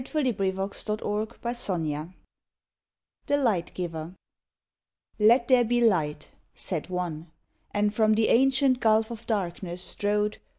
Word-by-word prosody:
no 255 -2 +1
PERSONAL 195 0 -2 0.7
POEMS 170 -11 -2 1.2
THE 285 - +2
LIGHT 220 -11 0
GIVER 170 -1 -5 1.0
"Let 235 +3 +5
there 255 -2 +5
be 240 +1 +1
light!" 160 -10 +1 0.2
said 170 -2 -3
One. 175 -3 -4 0.4
And 205 0 0
from 215 0 +3
the 220 0 +2
ancient 265 +1 +4
gulf 220 0 +3
of 230 -1 -8
darkness 180 -4 -3
strode. 210 +1 -1
210 Hz, 115 wpm, -27 LUFS, 175-235 Hz, 1.2 s, Let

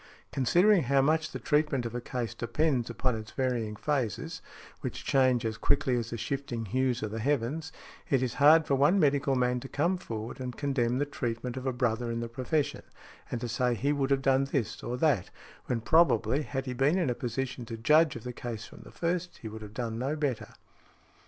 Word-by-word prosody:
Considering 175 - +4
how 135 +1 +2
much 155 +3 +2
the - - -5
treatment 150 -4 +1
of 115 - -4
a 120 - -3
case 120 -1 -3
depends 130 -1 0
upon 125 +1 -1
its 110 0 -7
varying 120 -5 -1
phases, 130 -4 -2 0.4
which - - -5
change 130 -3 +3
as 110 -1 -3
quickly 130 - +2
as 115 -2 -2
the 115 - -4
shifting 125 -2 -3
hues 125 +2 0
of 105 - -3
the 115 - -4
heavens, 145 +5 -1 0.4
it 135 -2 +3
is 125 - -1
hard 155 +2 +7
for - - 0
one 145 +9 +4
medical 140 -3 +2
man 125 0 +1
to 135 +2 -9
come 170 +6 +1
forward 115 -8 -6
and 125 -1 -5
condemn 130 -4 0
the 145 - +1
treatment 125 -3 -4
of 130 0 -4
a - - +2
brother 120 -1 0
in 115 0 -2
the 115 - -3
profession, 130 +5 -1 0.5
and 120 - -3
to 120 - -2
say 125 +1 +1
he 140 +6 +1
would 140 -2 0
have 135 -1 +2
done 135 0 +3
this 130 -6 -2
or 125 +1 -3
that, 130 - +2 0.4
when 120 - 0
probably, 135 -1 +3
had 135 -2 -4
he 130 - -3
been 135 +7 +2
in 165 -9 +1
a - - +1
position 125 0 -3
to 115 -1 -6
judge 150 +7 +4
of 115 - -7
the 125 - -5
case 115 -3 -6
from - - -13
the - - -13
first, 175 +1 -2
he - - -4
would 110 0 -8
have 105 0 -10
done 115 -2 -3
no 135 +5 -1
better. 145 -6 -3
130 Hz, 215 wpm, -29 LUFS, 115-145 Hz, 0.5 s, hard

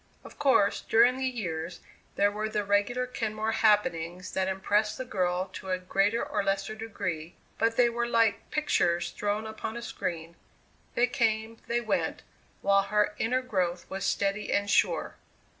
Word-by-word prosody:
Of - - -13
course, 260 -8 +3
during 240 +3 +4
the 265 0 0
years, 175 -8 -4 0.4
there 205 0 +3
were 215 +1 -3
the 210 -1 -1
regular 205 +5 +1
Kenmore 220 -3 -2
happenings 185 -5 +1
that 190 0 0
impressed 205 +3 +1
the 260 - -4
girl 185 -4 0
to 190 - -7
a 185 - +1
greater 195 +5 +1
or - - -1
lesser 195 +1 -1
degree, 185 -7 -5 0.2
but 230 0 +2
they 245 - +6
were 235 0 -1
like 230 -3 +2
pictures 175 - +1
thrown 210 +1 -2
upon 220 +1 -5
a - - -5
screen 170 -6 -5 0.6
they 240 - +4
came, 225 -3 0
they 240 0 0
went, 215 -3 -1 0.4
while 200 0 +5
her 210 +1 +1
inner 255 +3 +1
growth 180 -7 -1
was 195 0 -3
steady 200 +1 0
and 200 0 +1
sure. - - +2
210 Hz, 160 wpm, -28 LUFS, 190-230 Hz, 0.6 s, they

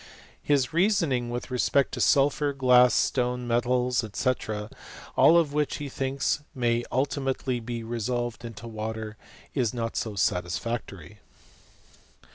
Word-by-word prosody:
f - - -21
His 140 -3 +2
reasoning 165 - +2
with 120 +2 -5
respect 130 +2 +2
to - - -4
sulphur, 145 +1 +3
glass, 125 -2 +5
stone, 125 -1 0
metals, 125 +1 +1
&c., 130 - +2 0.8
all 170 - +6
of 155 -4 +2
which 150 -1 0
he 145 -1 -5
thinks 135 +2 -1 0.2
may 120 -2 +1
ulti 140 +3 0
mately 130 -2 -2
be 115 0 -5
resolved 120 +1 -3
into 115 0 -8
water, 110 0 -5 0.4
is 125 -4 0
not 115 -1 -3
so 110 -3 -3
satisfactory. 95 +1 -2
125 Hz, 130 wpm, -27 LUFS, 115-135 Hz, 0.8 s, all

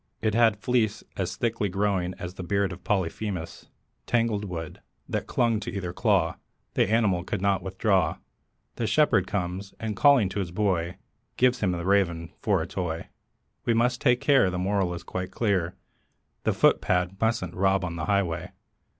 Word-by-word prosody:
It 110 -1 0
had 115 -1 +4
a - - -24
fleece 110 -2 0
as 95 -2 -2
thickly 115 -3 -1
growing 95 -2 0
As 90 0 -6
beard 95 +1 -1
of 85 - -12
Polyphemus 95 -2 -2 0.4
tangled 115 -4 +1
wood 85 -4 -6 0.3
That - - -3
clung 115 -3 +1
to 105 - -5
either 90 -2 -4
claw; - - +2 0.4
the - - +2
animal 105 -6 +2
could - - -3
not 100 0 +1
withdraw. 95 -1 +1 0.6
The 115 - -1
shepherd 110 -11 +3
comes, 95 0 -3
and 110 -2 -3
calling 140 -6 +5
to 100 - -3
his 95 -3 -2
boy, 90 -2 0 0.4
Gives 125 0 +3
him 95 -3 +1
the 85 -1 -4
Raven 85 -4 +1
for - - +1
a - - -6
toy. 85 -3 -4 0.5
We 115 - +2
must 120 +2 +1
take 120 0 +3
care; 135 -9 +4
the 90 - -3
moral 95 -1 0
is 85 - -8
quite 90 0 -4
clear 95 -6 0 0.7
The - - +3
footpad 90 +1 +2
mustn't 110 -6 0
rob 95 0 +2
on 85 -1 -4
the 80 -2 -3
highway. 90 -5 -1
95 Hz, 170 wpm, -26 LUFS, 90-110 Hz, 0.7 s, calling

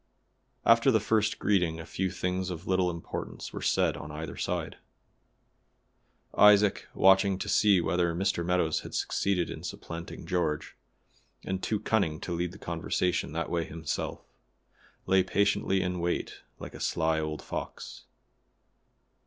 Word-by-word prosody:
After 115 +3 +6
the 110 -4 +4
first 110 0 +1
greeting 90 -5 +1
a 80 - -7
few 95 +4 -2
things 90 +1 -2
of 90 0 -6
little 95 -1 +2
importance 85 -1 -6
were - - -5
said - - +2
on 75 - -8
either 75 +2 -6
side. - - -3 1.6
Isaac 105 -1 +5
watching 95 0 +5
to 100 - -5
see 100 -1 +4
whether 85 -1 +1
Mr. 95 -1 0
Meadows 85 -3 +1
had - - -8
succeeded 95 -3 0
in - - -7
supplanting 85 0 -7
George, 80 -5 -1 0.7
and 95 0 -2
too 110 - -1
cunning 90 -10 0
to 90 - -4
lead 85 0 -2
the 100 - -11
conversation 85 -2 -1
that 85 +1 -3
way 85 -1 +1
himself, 80 -1 -4 0.8
lay 95 0 +4
patiently 95 0 +1
in 90 -1 -2
wait 85 0 -2 0.2
like - - -9
a - - -9
sly 80 -1 +1
old 75 -1 -4
fox. - - -7
90 Hz, 145 wpm, -29 LUFS, 85-95 Hz, 1.6 s, After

